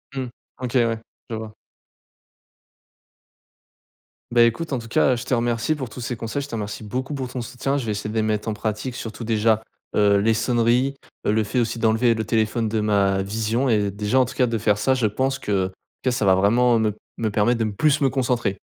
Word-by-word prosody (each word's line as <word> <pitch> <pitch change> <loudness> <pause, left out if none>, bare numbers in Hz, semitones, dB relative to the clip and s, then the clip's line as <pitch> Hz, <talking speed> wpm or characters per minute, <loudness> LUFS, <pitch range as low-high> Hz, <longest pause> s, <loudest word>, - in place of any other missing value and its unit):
Mmh. 130 -1 -2 0.3
OK, 125 -2 -4
ouais, 115 -1 -1 0.3
je 115 - -3
vois. 110 -1 -6 2.8
Bah, 120 0 +6
écoute, 115 +8 +1
en 130 - 0
tout 115 - -9
cas, 125 +2 +3
je 120 - -6
te - - -1
remercie 120 +4 +1
pour 130 -5 -5
tous 120 - -10
ces 125 0 -3
conseils. 115 +5 -3
Je 140 - -6
te 120 - -5
remercie 105 0 -5
beaucoup 130 +7 -3
pour 135 -3 -3
ton 125 0 -4
soutien. 125 +4 -2
Je 135 - -3
vais 110 - -1
essayer 105 +1 -3
de 110 - -6
les 110 - +2
mettre 110 0 -1
en 110 - 0
pratique, 110 +4 -3
surtout, 115 -1 -6
déjà, 110 0 +2 0.3
heu, 100 -1 +4
les 110 +3 +3
sonneries, 120 +3 +2 0.3
le 110 +1 +2
fait 125 +4 -1
aussi 115 0 -1
d'enlever 115 +2 +3
le 110 -1 -2
téléphone 110 +1 0
de 110 +1 0
ma 100 -2 +2
vision. 110 +5 -1
Et 105 -3 +2
déjà, 105 +5 +1
en - - +3
tout 130 - -8
cas 125 - +3
de 115 -1 -1
faire 105 -1 +2
ça, 120 +6 +2
je 125 -4 +2
pense 130 +6 -1
que 95 -2 0 0.3
que - - +2
ça 120 -4 0
va 95 -1 +6
vraiment 115 +5 +4
me 110 -1 +1 0.2
me 110 - 0
permettre 110 +3 +2
de 115 - +1
me 105 - -3
plus 150 +7 +2
me 135 - +4
concentrer. 120 -6 0
115 Hz, 220 wpm, -23 LUFS, 105-125 Hz, 2.8 s, Bah